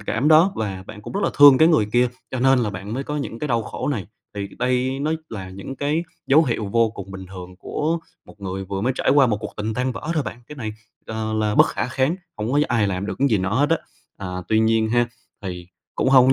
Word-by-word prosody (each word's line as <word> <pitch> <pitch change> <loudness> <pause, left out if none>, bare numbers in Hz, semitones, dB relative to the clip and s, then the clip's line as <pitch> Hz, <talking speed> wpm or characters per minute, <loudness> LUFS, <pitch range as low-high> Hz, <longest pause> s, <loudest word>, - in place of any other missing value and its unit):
cảm 115 +7 0
đó, 165 +5 +6
và 95 -4 -3
bạn 105 -1 -10
cũng - - -8
rất 200 - -1
là - - +2
thương 145 -2 +9
cái 160 +1 +6
người 150 -11 +4
kia 125 0 +4 0.2
cho 130 - -3
nên 135 0 +5
là 115 -4 0
bạn 100 +2 -6
mới 135 +2 -3
có 150 - -3
những 140 -5 -4
cái 150 - -3
đau 115 -2 +1
khổ - - -4
này. 115 -10 -2 0.3
Thì 100 -1 -4
đây 125 +2 0
nó 155 +2 0 0.2
là 95 -4 -6
những 100 +8 -8
cái 150 +4 0 0.2
dấu 155 +4 +6
hiệu 115 -6 -1
vô 115 +2 +2
cùng 100 - -8
bình 95 -1 -8
thường 90 -1 -10
của 160 +9 -1 0.3
một 105 - -16
người 95 0 -4
vừa 95 0 -4
mới 125 +5 +1
trải - - +2
qua 140 -1 +6
một 110 -4 +1
cuộc - - -7
tình 110 +1 -2
tan 125 +1 0
vỡ 115 - -7
thôi 155 - +1
bạn. 115 +1 -7
Cái 150 - -10
này 110 -4 -4 0.3
là 110 0 -3
là 110 -1 0
bất - - +7
khả - - -2
kháng, 135 +6 +1 0.2
hông 110 +3 -2
có 145 - +4
ai 110 -3 +2
làm 95 +1 -2
được - - -3
cái 140 +1 +3
gì 110 - +2
nó 95 +1 -1
hết 145 +4 +2
á, 165 - +5 0.4
à, 100 - -6 0.2
tuy 110 - +3
nhiên 110 0 +3
ha, 120 +1 +2 0.3
thì 90 -2 -6 0.3
cũng - - +1
hông 130 -2 +7
có 130 - +6
115 Hz, 270 wpm, -22 LUFS, 105-135 Hz, 0.4 s, thương